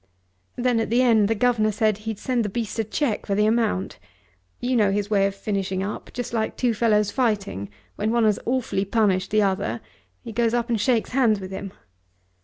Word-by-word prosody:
Then 245 Hz, -1 st, +1 dB
at 225 Hz, -, -1 dB
the 240 Hz, +3 st, +3 dB
end 225 Hz, -4 st, +4 dB
the 225 Hz, -, +1 dB
governor 220 Hz, -1 st, +2 dB
said 215 Hz, 0 st, +1 dB
he'd 220 Hz, 0 st, -5 dB
send 245 Hz, +1 st, -1 dB
the 210 Hz, -, -2 dB
beast 225 Hz, +2 st, -4 dB
a -, -, +2 dB
cheque 220 Hz, +1 st, -2 dB
for 200 Hz, -, 0 dB
the 210 Hz, +1 st, +3 dB
amount. 220 Hz, -4 st, 0 dB, 0.6 s
You 250 Hz, +1 st, -1 dB
know 210 Hz, -4 st, +4 dB
his 205 Hz, +1 st, -2 dB
way 195 Hz, -1 st, +4 dB
of 195 Hz, -, -5 dB
finishing 195 Hz, -2 st, -2 dB
up, 205 Hz, +2 st, -5 dB
just 245 Hz, -1 st, -5 dB
like 220 Hz, -1 st, -1 dB
two 245 Hz, -2 st, +1 dB
fellows 210 Hz, -2 st, +2 dB
fighting; 200 Hz, -, -1 dB, 0.3 s
when 210 Hz, +1 st, 0 dB
one 235 Hz, 0 st, +2 dB
has 215 Hz, -2 st, +3 dB
awfully 245 Hz, -6 st, 0 dB
punished 200 Hz, -2 st, +1 dB
the 215 Hz, 0 st, +3 dB
other 190 Hz, -, -1 dB, 0.4 s
he -, -, -7 dB
goes 230 Hz, +1 st, +1 dB
up 240 Hz, 0 st, -1 dB
and 225 Hz, -3 st, +1 dB
shakes 235 Hz, -1 st, +1 dB
hands 240 Hz, -5 st, +3 dB
with 190 Hz, -1 st, -8 dB
him. 195 Hz, 0 st, -6 dB
215 Hz, 205 wpm, -24 LUFS, 200-235 Hz, 0.6 s, end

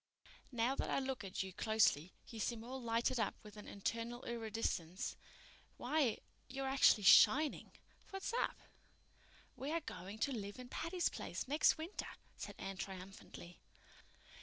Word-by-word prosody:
Now 240 Hz, +1 st, +2 dB
that -, -, -1 dB
I -, -, +1 dB
look 265 Hz, -3 st, -2 dB
at 190 Hz, -1 st, -2 dB
you 190 Hz, -1 st, -7 dB
closely 205 Hz, -7 st, +3 dB, 0.2 s
you 225 Hz, -, -8 dB
seem 225 Hz, +1 st, -1 dB
all 260 Hz, +2 st, -6 dB
lighted 235 Hz, +1 st, +1 dB
up 220 Hz, -, 0 dB
with 210 Hz, -1 st, -12 dB
an 210 Hz, -, -10 dB
internal 230 Hz, +4 st, -3 dB
iridescence. 220 Hz, -6 st, -2 dB, 0.6 s
Why, 260 Hz, -3 st, +2 dB, 0.3 s
you're 270 Hz, +1 st, -3 dB
actually 265 Hz, -5 st, +5 dB
shining! 285 Hz, +9 st, +6 dB, 0.4 s
What's 390 Hz, +3 st, -4 dB
up?" 485 Hz, -, 0 dB, 1.0 s
"We 270 Hz, +3 st, -4 dB
are 335 Hz, +1 st, 0 dB
going 190 Hz, -, -7 dB
to 275 Hz, +5 st, +1 dB
live 205 Hz, -5 st, -4 dB
in 250 Hz, -1 st, -9 dB
Patty's 345 Hz, +5 st, 0 dB
Place -, -, -4 dB
next 295 Hz, +4 st, +4 dB
winter," 325 Hz, +5 st, -5 dB, 0.3 s
said -, -, -7 dB
Anne 195 Hz, 0 st, -5 dB
triumphantly. 190 Hz, -2 st, -8 dB
230 Hz, 145 wpm, -38 LUFS, 200-265 Hz, 1.0 s, shining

